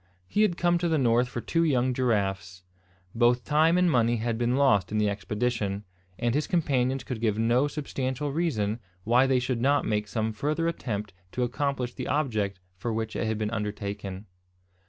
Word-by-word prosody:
He 210 - +1
had 180 -5 +2
come 175 0 +2
to 175 - 0
the 160 - +2
north 125 -2 +3
for 120 - -4
two 165 +6 +1
young 130 -5 +2
giraffes. 95 -7 -1 0.5
Both 120 +1 +3
time 160 +3 +3
and 180 0 +4
money 120 -3 +3
had 115 0 -1
been 120 +2 +1
lost 105 -10 +3
in 110 - 0
the 105 0 +2
expedition, 105 +1 -2 0.3
and 120 -1 0
his 150 +2 0
companions 135 -6 +1
could 120 -4 -5
give 110 -3 +1
no 120 +5 +3
substantial 140 -1 -3
reason 120 -9 -1 0.2
why 125 +5 +4
they 135 -1 +3
should 125 -1 -1
not 140 +3 +3
make 105 -1 0
some 110 0 -2
further 150 +8 -1
attempt 105 - -3 0.2
to 125 - 0
accomplish 125 -1 -1
the - - -5
object 110 -10 -1 0.2
for 115 +6 -3
which 110 0 -3
it - - -1
had 110 -1 -1
been 105 0 -2
undertaken. 105 -2 -4
120 Hz, 185 wpm, -27 LUFS, 105-140 Hz, 0.5 s, and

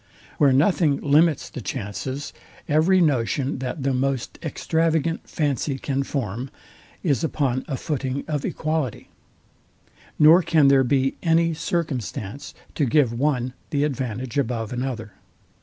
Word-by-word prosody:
Where 145 -2 +5
nothing 150 +1 +3
limits 150 +1 +3
the 130 - -8
chances, 125 +5 -5 0.3
every 165 +5 +4
notion, 135 -2 +1
that 130 +2 -4
the 135 0 +1
most 130 -1 -2
extravagant 165 0 -1
fancy 145 -2 -1
can 135 0 -2
form, 130 -2 -3 0.5
is 155 -3 +1
upon 135 -5 0
a 135 - -3
footing 140 -2 -3
of 150 -3 -2
equality; 155 -6 -2 1.1
nor 160 +4 +7
can 155 -5 +4
there 135 -1 +5
be 135 +1 +1
any 165 0 +3
circumstance 140 - -4 0.2
to 145 - +1
give 130 -2 +3
one 125 -1 0 0.2
the 145 -1 0
advantage 130 -2 -2
above 115 -3 -2
another. 120 -3 -4
140 Hz, 125 wpm, -23 LUFS, 130-155 Hz, 1.1 s, nor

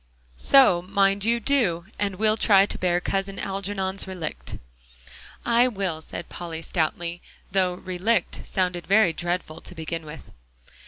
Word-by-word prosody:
"So 255 - +5
mind 195 +1 +1
you 235 +1 +2
do, 210 -10 +1
and 200 -2 0
we'll 215 +2 +2
try 200 -3 +5
to - - -3
bear 175 -1 +2
Cousin 195 +1 -2
Algernon's 195 0 -2
relict." 180 -5 -5 0.9
"I 235 +1 +4
will," 190 -8 -3
said 170 - -8
Polly 165 -2 -6
stoutly, 170 +1 -2 0.3
though 185 -1 +2
"relict" 185 +6 -1
sounded 180 -2 -2
very 200 -3 +4
dreadful 175 -2 -3
to 180 - -7
begin 165 0 -4
with. 155 +1 -11
190 Hz, 140 wpm, -25 LUFS, 175-200 Hz, 0.9 s, So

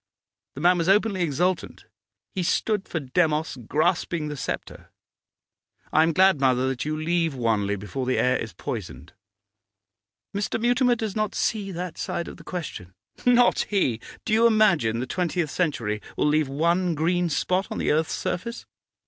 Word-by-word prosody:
The 140 - -6
man 175 +1 +4
was 165 +2 0
openly 200 -1 +3
exultant; 175 +3 -1 0.5
he 190 - -2
stood 200 +3 0
for 165 - -2
Demos 155 +1 0
grasping 155 - 0
the 150 - -4
sceptre. 135 - -6 1.0
I 155 - +5
am 165 +1 +3
glad, 190 -1 +4
mother, 130 -1 +3
that 125 -2 -3
you 155 0 -2
leave 165 -1 0
Wanley 110 -5 0
before 105 +6 -5
the 130 - +1
air 125 0 +3
is 110 - -3
poisoned.' 85 - -7 1.2
'Mr. 205 +2 -2
Mutimer 245 +1 +3
does 220 -3 -4
not 215 -1 -1
see 205 -3 -1
that 180 -1 -5
side 170 - -3
of - - -9
the - - -13
question?' 110 - -6 0.3
'Not 245 0 +4
he! 130 - +1 0.2
Do 215 - 0
you 230 +2 +6
imagine 175 - +3
the - - -2
twentieth 170 +1 -1
century 115 - -1 0.2
will - - +1
leave 150 -1 +2
one 170 +4 +1
green 175 +3 +1
spot 185 +5 0
on - - -5
the - - +1
earth's 155 +1 +1
surface? 235 +6 -4
165 Hz, 165 wpm, -25 LUFS, 135-190 Hz, 1.2 s, you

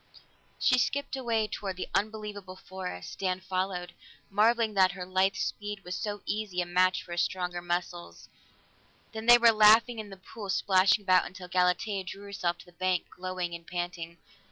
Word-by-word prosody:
She 255 -2 +3
skipped 280 +3 -1
away 230 -4 0
toward 195 -3 -5
the - - -4
unbelievable 210 -3 -3
forest; 185 - -7
Dan 185 -1 -1
followed, 185 -1 -3 0.4
marveling 220 +2 +3
that 190 -2 +4
her 180 -1 -6
lithe 190 +1 +1
speed 205 0 -4
was 180 - -6
so 205 -1 -4
easy 210 -4 -3
a 175 - +1
match 185 +1 +2
for - - -13
his 175 0 0
stronger 180 -1 -2
muscles. 175 - -4 0.8
Then 220 +1 -7
they 240 0 +10
were 235 -1 +6
laughing 220 +2 +5
in 215 -1 -7
the 195 - -10
pool, 200 +2 -9
splashing 190 +1 +3
about 185 -2 +4
until 185 0 -10
Galatea 185 +2 +1
drew 195 +2 -8
herself 180 -4 -2
to - - -14
the 175 - -17
bank, 180 0 -1
glowing 185 -1 -4
and 170 -1 -8
panting. 175 -1 -5
185 Hz, 175 wpm, -29 LUFS, 180-210 Hz, 0.8 s, they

